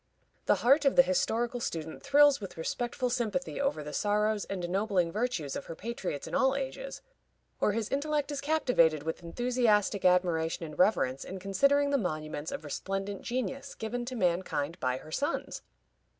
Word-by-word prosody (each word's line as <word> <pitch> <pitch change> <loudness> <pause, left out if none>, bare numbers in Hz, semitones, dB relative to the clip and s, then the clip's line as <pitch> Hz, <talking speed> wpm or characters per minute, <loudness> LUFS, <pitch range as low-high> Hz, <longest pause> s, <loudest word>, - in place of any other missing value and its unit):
The - - +5
heart 275 +4 +6
of 275 - +3
the 265 - +8
historical 235 +5 0
student 160 -8 -4
thrills 285 -2 +5
with 195 - -8
respectful 240 +8 -2
sympathy 245 +3 -1
over 275 - 0
the 150 - -7
sorrows 210 0 +1
and 185 -3 -4
ennobling 185 -1 +1
virtues 210 - -2
of - - -5
her 165 - -6
patriots 190 -8 -4
in - - -9
all 265 0 +3
ages, 280 - -5 0.6
or 210 - +2
his 220 -1 -1
intellect 295 +2 -1
is 285 -1 -3
captivated 250 - +2
with 160 +2 -4
enthusiastic 215 +1 +1
admiration 175 -3 +2
and 150 -2 -10
reverence 135 -9 +2
in 190 - -7
considering 280 +9 +2
the 280 - +3
monuments 155 -5 -3
of - - -5
resplendent 195 +6 -4
genius 270 +3 -3
given 235 +2 -3
to 255 +1 -5
mankind 175 -5 -1
by 130 0 0
her 155 - -12
sons. 285 - -2
210 Hz, 165 wpm, -30 LUFS, 170-260 Hz, 0.6 s, the